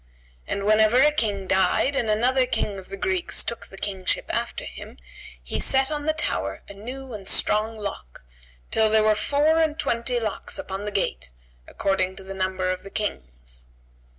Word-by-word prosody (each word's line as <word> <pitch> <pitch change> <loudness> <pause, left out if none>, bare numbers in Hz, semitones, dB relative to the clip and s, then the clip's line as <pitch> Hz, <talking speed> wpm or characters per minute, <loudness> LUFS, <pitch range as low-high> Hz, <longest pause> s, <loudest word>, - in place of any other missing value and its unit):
And 200 - -2
whenever 215 +2 +5
a 300 +3 +6
King 205 -9 0
died 190 +9 +2
and 230 -5 +1
another 250 +4 +3
King 200 -4 -1
of 185 - -13
the 195 - -6
Greeks 370 - +1
took 235 - -5
the 195 - -13
Kingship 190 -2 -1
after - - -2
him, - - -10 0.5
he - - -2
set 265 +1 +2
on 295 0 -3
the 310 - +3
tower 100 - -2
a - - -9
new 250 +5 -8
and 200 -3 -7
strong 220 +3 +2
lock, 195 - -7 0.5
till 220 -1 +4
there 215 0 +4
were 215 0 +5
four 290 +8 +2
and 315 -1 +1
twenty 240 -1 0
locks 220 -3 -4
upon 195 +2 -5
the 210 - -3
gate, 65 - -1 0.4
according 190 -1 0
to 195 - -10
the 195 0 -7
number 185 -1 -1
of 185 - -4
the 195 - -10
Kings. - - -5
210 Hz, 180 wpm, -24 LUFS, 190-250 Hz, 0.5 s, a